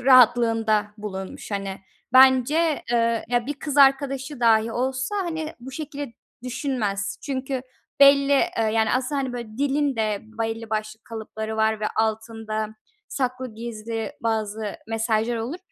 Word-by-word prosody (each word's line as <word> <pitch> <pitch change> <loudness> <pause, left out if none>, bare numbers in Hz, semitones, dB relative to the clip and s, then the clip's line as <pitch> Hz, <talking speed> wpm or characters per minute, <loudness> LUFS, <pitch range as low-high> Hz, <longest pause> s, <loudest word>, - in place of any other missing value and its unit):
rahatlığında 230 -4 +5
bulunmuş, 190 -2 -6
hani, 195 -1 -3 0.3
bence, 265 +5 +5
eee, 230 -1 +2
ya, 240 0 +1
bir 290 - -2
kız 290 0 -5
arkadaşı 275 0 +3
dâhi 225 -1 +4
olsa, 260 - -1
hani, 320 -5 -3
bu 255 +2 -8
şekilde 285 -2 -6 0.3
düşünmez. 245 -6 -2
Çünkü 265 -1 -3 0.4
belli, 280 0 +7
eee, 315 +5 +3 0.2
yani 220 -1 +2
aslında, 260 +3 0
hani, 260 -2 -3
böyle 235 -2 -7
dilin 280 -1 +1
de 215 -2 0
belli 225 0 -4
başlı 215 0 -3
kalıpları 220 -1 -5
var 220 0 +2
ve 215 - 0
altında 220 -1 -1 0.4
saklı, 255 -2 -3
gizli 225 +2 -5
bazı 220 -2 -2
mesajlar 225 +1 0
olur. 240 +10 -4
235 Hz, 135 wpm, -24 LUFS, 220-270 Hz, 0.4 s, belli